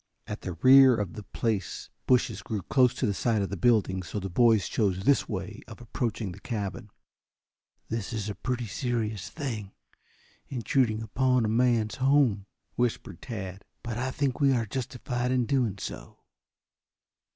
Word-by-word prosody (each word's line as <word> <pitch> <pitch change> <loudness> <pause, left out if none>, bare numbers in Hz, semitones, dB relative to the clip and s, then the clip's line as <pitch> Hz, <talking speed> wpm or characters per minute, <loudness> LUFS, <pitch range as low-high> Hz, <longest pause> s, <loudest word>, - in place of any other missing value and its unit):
At 105 - -6
the 90 - -4
rear 130 +7 +7
of 100 -5 -3
the 105 - -7
place 105 -2 -3 0.2
bushes 125 -1 +2
grew 110 -6 -4
close 125 +2 +3
to - - -1
the 105 - +1
side 110 0 +1
of 95 - -3
the - - -2
building, 100 -2 +2
so 100 +3 -5
the 95 -1 -5
boys 115 0 +4
chose 95 -4 0
this 140 +5 +3
way 100 +1 -5
of 110 - -11
approaching 115 -4 -3
the - - -10
cabin. 105 -2 -4 1.0
"This 115 -1 -3
is 110 -3 -3
a 105 - -3
pretty 125 +2 -3
serious 110 - -2
thing, 110 -8 -5 0.7
intruding 115 -2 0
upon 125 +2 +2
a - - 0
man's 115 -1 +2
home," 130 -7 +3 0.3
whispered 120 -2 -2
Tad. 100 -5 -6 0.2
"But 120 -1 -4
I 130 +1 -1
think 135 0 -1
we 140 -2 +4
are 120 -3 +1
justified 125 +1 -3
in 125 -2 +2
doing 120 -6 0
so." - - -8
115 Hz, 160 wpm, -28 LUFS, 100-125 Hz, 1.0 s, rear